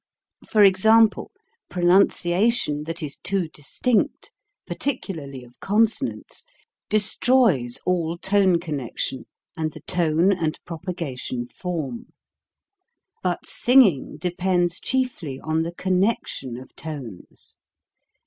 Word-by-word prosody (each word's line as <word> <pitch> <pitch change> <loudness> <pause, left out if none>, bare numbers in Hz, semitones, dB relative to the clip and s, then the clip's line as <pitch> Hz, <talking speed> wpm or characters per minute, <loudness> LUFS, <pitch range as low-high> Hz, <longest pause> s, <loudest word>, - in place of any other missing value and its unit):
For 215 -2 +5
example: 220 +3 +4 0.4
Pronunciation 175 -1 +2
that 165 +1 -5
is 145 -2 -5
too 190 -3 -1
distinct, 210 - -1 0.4
partic 275 -3 -1
ularly 140 -8 -7
of 120 0 -21
consonants, 220 +2 -1 0.5
destroys 210 - +2
all 170 -2 0
tone 190 +1 +2
&^t*&c, 170 - -10
connection 135 -4 -3 0.3
and 155 -1 -3
the - - -11
tone 175 0 +2
and 165 -5 -1
propa 175 +2 -5
gation 130 -7 -4
form. 180 - -5 1.1
But 180 -1 -2
singing 235 - +3
de 175 +3 -2
pends 175 -1 0
chiefly 250 - -2
on 160 +2 -1
the 165 +1 -3
connection 185 - -1
of 130 +1 -13
tones. 140 - -9
175 Hz, 110 wpm, -23 LUFS, 150-200 Hz, 1.1 s, For